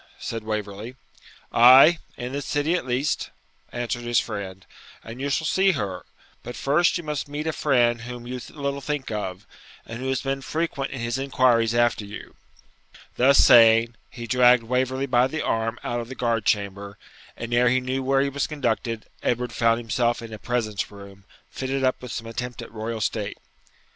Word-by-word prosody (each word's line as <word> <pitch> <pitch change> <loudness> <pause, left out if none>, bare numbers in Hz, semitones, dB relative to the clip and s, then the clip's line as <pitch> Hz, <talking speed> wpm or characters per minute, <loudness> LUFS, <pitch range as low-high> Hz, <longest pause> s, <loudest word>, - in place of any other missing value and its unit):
said 115 -1 -5
Waverley. 105 +2 -5 0.6
'Ay, 130 +8 +8 0.2
in 125 +1 -5
this 140 +1 -4
city 145 +3 0
at 175 -7 -2
least,' 130 +4 -1 0.4
answered 120 0 -3
his 120 -1 +2
friend, 95 -3 -6 0.4
'and 115 +3 -9
you 140 - -1
shall 160 +3 0
see 190 +4 +3
her; 100 - -4 0.3
but 120 - -8
first 155 +7 +2
you 175 - -7
must 150 -2 -3
meet 145 +2 -5
a 160 - -1
friend 120 -6 +2
whom 120 0 -8
you 125 +1 -5
little 140 -1 -4
think 145 -2 -3
of, 95 -3 -4 0.4
who 120 +3 -6
has 130 -1 -1
been 135 0 -2
frequent 145 -2 -2
in 135 - -6
his 120 +2 -2
inquiries 125 -4 +2
after 120 -2 +2
you.' 100 +1 -10 0.8
Thus 135 +3 +5
saying, 115 0 +6 0.2
he 120 -1 -8
dragged 125 0 +5
Waverley 130 +3 -1
by 125 -1 +3
the 155 +4 -4
arm 115 +1 -1
out 120 - -2
of 120 0 -6
the 130 - -7
guard 115 -4 -1
chamber, 100 -1 -1 0.4
and, 115 +1 -5
ere 120 0 +4
he 130 +1 +3
knew 130 +1 -2
where 135 +1 +2
he 140 - +1
was 140 +1 -2
conducted, 115 -6 -2 0.2
Edward 120 0 -1
found 115 0 +2
himself 120 0 -1
in 115 -1 -9
a 110 - -8
presence 110 -4 -2
room, 100 -1 -13 0.3
fitted 135 0 -3
up 130 0 +1
with 125 -2 -8
some 115 - -5
attempt 120 +1 -5
at - - -12
royal 110 0 -5
state. 105 -1 -2
120 Hz, 185 wpm, -24 LUFS, 115-135 Hz, 0.8 s, Ay